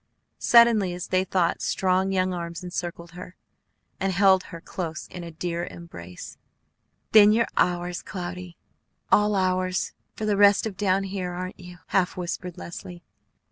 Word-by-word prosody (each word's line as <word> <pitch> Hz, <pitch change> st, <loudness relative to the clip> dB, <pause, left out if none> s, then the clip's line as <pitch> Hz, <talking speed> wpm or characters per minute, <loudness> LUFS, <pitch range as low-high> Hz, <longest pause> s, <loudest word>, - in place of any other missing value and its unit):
Suddenly, 230 Hz, -6 st, +5 dB
as 180 Hz, -, -6 dB
they 185 Hz, 0 st, +2 dB
thought, 185 Hz, -3 st, 0 dB
strong 190 Hz, 0 st, +1 dB
young 185 Hz, -1 st, +1 dB
arms 170 Hz, 0 st, -5 dB
encircled 175 Hz, -1 st, -5 dB
her, 180 Hz, +1 st, -10 dB, 0.6 s
and 195 Hz, 0 st, 0 dB
held 190 Hz, 0 st, +4 dB
her 170 Hz, -, -9 dB
close 165 Hz, -2 st, -5 dB
in 180 Hz, -, -8 dB
a 170 Hz, -, -7 dB
dear 170 Hz, +1 st, -3 dB
embrace. 90 Hz, -, -10 dB, 0.7 s
"Then 210 Hz, -1 st, +8 dB
you're 230 Hz, +2 st, +3 dB
ours, 175 Hz, 0 st, 0 dB
Cloudy, 180 Hz, -1 st, -7 dB, 0.5 s
all 210 Hz, 0 st, +4 dB
ours, 185 Hz, -1 st, 0 dB, 0.2 s
for 215 Hz, -, -4 dB
the 210 Hz, -2 st, +1 dB
rest 205 Hz, +1 st, +5 dB
of 215 Hz, -3 st, -4 dB
down 195 Hz, 0 st, +1 dB
here, 190 Hz, -2 st, -4 dB
aren't 185 Hz, +1 st, -6 dB
you?" 180 Hz, -1 st, -11 dB
half 185 Hz, -2 st, +1 dB
whispered 180 Hz, 0 st, -5 dB
Leslie. 175 Hz, 0 st, -9 dB
185 Hz, 150 wpm, -25 LUFS, 175-195 Hz, 0.7 s, Then